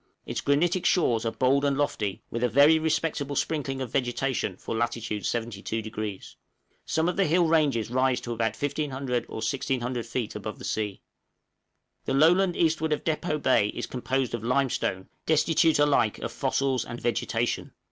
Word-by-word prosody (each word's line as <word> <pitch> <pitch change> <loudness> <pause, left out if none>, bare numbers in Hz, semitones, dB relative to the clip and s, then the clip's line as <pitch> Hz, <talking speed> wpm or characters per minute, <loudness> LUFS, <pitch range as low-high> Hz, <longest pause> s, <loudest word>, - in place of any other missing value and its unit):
Its - - -3
granitic 170 +6 +2
shores 115 -10 +2
are - - 0
bold 135 +3 +2
and 140 -1 +1
lofty, 105 -9 -1
with 115 +1 -2
a 125 - +3
very 145 +7 +6
respectable 155 -2 -1
sprinkling 135 -3 -1
of 120 - -7
vegetation 125 -6 -1
for - - -5
lat. 120 +1 0
72°. 110 -2 -4 0.5
Some 160 +1 +1
of 180 - -1
the 195 - +3
hill 170 +3 +3
ranges 145 -9 +2
rise 130 0 +2
to 120 - -4
about 110 -1 -1
1500 135 -4 -2
or - - -8
1600 125 0 -1
feet 115 -1 -4
above 105 +1 -5
the - - -9
sea. 105 -3 -2 1.0
The 135 - 0
low 155 +4 +6
land 185 -1 +2
eastward 160 -1 +2
of 150 - -3
Depôt 155 -1 -1
Bay 130 -6 +4
is - - -3
composed 130 0 -2
of 120 -2 -3
limestone, 125 -7 0 0.2
destitute 160 +1 +3
alike 145 -7 +3
of - - -5
fossils 135 -3 0
and 120 0 -7
vegetation. 120 0 -1
130 Hz, 165 wpm, -27 LUFS, 115-150 Hz, 1.0 s, very